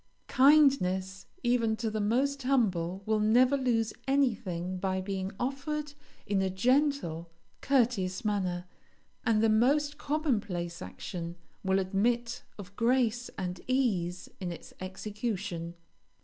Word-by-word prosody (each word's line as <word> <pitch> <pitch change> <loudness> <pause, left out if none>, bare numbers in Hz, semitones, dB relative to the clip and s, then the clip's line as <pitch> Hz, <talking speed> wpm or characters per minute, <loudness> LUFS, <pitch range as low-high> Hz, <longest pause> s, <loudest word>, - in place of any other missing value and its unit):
Kindness, 195 -10 +4 0.2
even 235 -2 +2
to 225 0 -2
the 215 0 -1
most 270 +7 +1
humble, 195 -9 +1
will 220 0 +1
never 245 +6 +4
lose 235 -5 +1
anything 190 -10 0
by 190 0 -1
being 190 0 -3
offered 285 +3 -3 0.3
in 195 -1 +1
a 190 - +1
gentle, 200 - +1 0.3
courteous 230 -9 +1
manner, 185 -4 -1 0.6
and 220 -1 +2
the - - +5
most 285 +7 +2
common 295 -5 +1
place 175 -4 -5
action 170 - -6 0.3
will 190 0 +2
admit 230 +6 0 0.2
of 200 -1 -10
grace 240 0 +1
and 180 -1 -4
ease 195 -9 0
in 180 -3 -3
its 170 - -10
execution. 190 -3 -4
215 Hz, 120 wpm, -30 LUFS, 185-255 Hz, 0.6 s, the